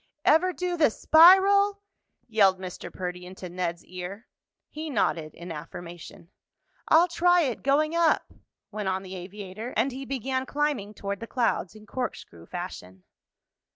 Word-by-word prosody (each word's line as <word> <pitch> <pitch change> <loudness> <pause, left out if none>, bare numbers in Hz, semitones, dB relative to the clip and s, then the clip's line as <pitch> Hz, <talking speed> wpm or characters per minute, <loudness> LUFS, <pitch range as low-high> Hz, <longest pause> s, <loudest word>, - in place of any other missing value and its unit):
"Ever 345 +4 +4
do 360 -1 -3
the 310 -5 +5
spiral?" 390 - +6 0.4
yelled 200 -5 +4
Mr. 185 -1 -8
Perdy 180 -1 -5
into 185 0 -9
Ned's 175 -1 -4
ear. 185 +5 -8 0.5
He 310 +1 -6
nodded 165 - -1
in 170 +1 -8
affirmation. 170 +2 -9 0.6
"I'll 335 +3 +6
try 355 +1 +3
it 260 -7 -2
going 300 +3 +2
up," 335 -2 +2 0.4
went 210 -2 -3
on 190 0 -2
the 190 0 -8
aviator 195 +5 -8
and 275 - +2
he 265 +2 -7
began 260 0 -2
climbing 280 -9 -1
toward 200 0 -4
the 230 - -7
clouds 230 -6 -1
in 215 0 -14
corkscrew 200 - -6
fashion. 90 0 -7
215 Hz, 145 wpm, -27 LUFS, 185-305 Hz, 0.6 s, spiral